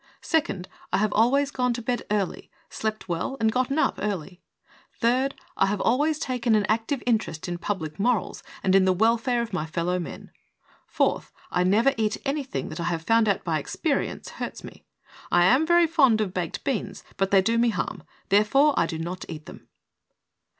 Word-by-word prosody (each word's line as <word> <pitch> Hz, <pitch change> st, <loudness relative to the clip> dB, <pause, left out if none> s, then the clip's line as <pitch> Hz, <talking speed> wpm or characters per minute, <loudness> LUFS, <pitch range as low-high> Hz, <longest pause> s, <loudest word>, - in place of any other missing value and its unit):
Second, 200 Hz, -, 0 dB, 0.2 s
I -, -, +2 dB
have 210 Hz, +1 st, +1 dB
always 275 Hz, +6 st, +3 dB
gone 250 Hz, -3 st, 0 dB
to 240 Hz, -, -5 dB
bed 245 Hz, +1 st, -1 dB
early, 205 Hz, -3 st, -2 dB, 0.2 s
slept 215 Hz, 0 st, -3 dB
well 175 Hz, +10 st, -2 dB
and 220 Hz, -1 st, +2 dB
gotten 255 Hz, +4 st, 0 dB
up -, -, +1 dB
early. 185 Hz, -3 st, -4 dB, 0.6 s
Third, 255 Hz, +4 st, +1 dB, 0.2 s
I 195 Hz, -, +3 dB
have 200 Hz, 0 st, -1 dB
always 295 Hz, +8 st, +2 dB
taken 250 Hz, -5 st, 0 dB
an 210 Hz, -1 st, +2 dB
active 225 Hz, +5 st, -1 dB
interest 220 Hz, -10 st, -1 dB
in 175 Hz, 0 st, -4 dB
public 165 Hz, -6 st, -4 dB
morals 230 Hz, -1 st, 0 dB, 0.2 s
and 190 Hz, -, +2 dB
in 195 Hz, -1 st, +5 dB
the 185 Hz, -, +4 dB
welfare 230 Hz, +4 st, +2 dB
of 225 Hz, -3 st, -8 dB
my 160 Hz, -4 st, -2 dB
fellow 175 Hz, +3 st, -1 dB
men. 175 Hz, -, -8 dB, 0.6 s
Fourth, -, -, 0 dB, 0.2 s
I 180 Hz, -, +2 dB
never 220 Hz, +9 st, +3 dB
eat 220 Hz, -1 st, 0 dB
anything 275 Hz, -1 st, -2 dB
that -, -, -7 dB
I 170 Hz, -, -2 dB
have 170 Hz, -2 st, -2 dB
found 225 Hz, +2 st, +3 dB
out 200 Hz, -, 0 dB
by 160 Hz, -3 st, 0 dB
experience 280 Hz, -, -2 dB
hurts -, -, -6 dB
me. -, -, -12 dB, 0.5 s
I 175 Hz, 0 st, +5 dB
am 265 Hz, -, +4 dB
very 345 Hz, 0 st, +5 dB
fond 275 Hz, -9 st, +4 dB
of 200 Hz, -4 st, -1 dB
baked 175 Hz, -3 st, -3 dB
beans, 265 Hz, -6 st, -3 dB
but 195 Hz, 0 st, 0 dB
they 195 Hz, -1 st, +4 dB
do 230 Hz, +3 st, +2 dB
me 235 Hz, 0 st, +4 dB
harm, 225 Hz, -, -3 dB, 0.3 s
therefore, 240 Hz, +9 st, +4 dB
I 165 Hz, -, +2 dB
do 160 Hz, -, -4 dB
not 175 Hz, +3 st, -5 dB
eat 155 Hz, -2 st, -7 dB
them." -, -, -12 dB
220 Hz, 190 wpm, -25 LUFS, 185-250 Hz, 0.6 s, in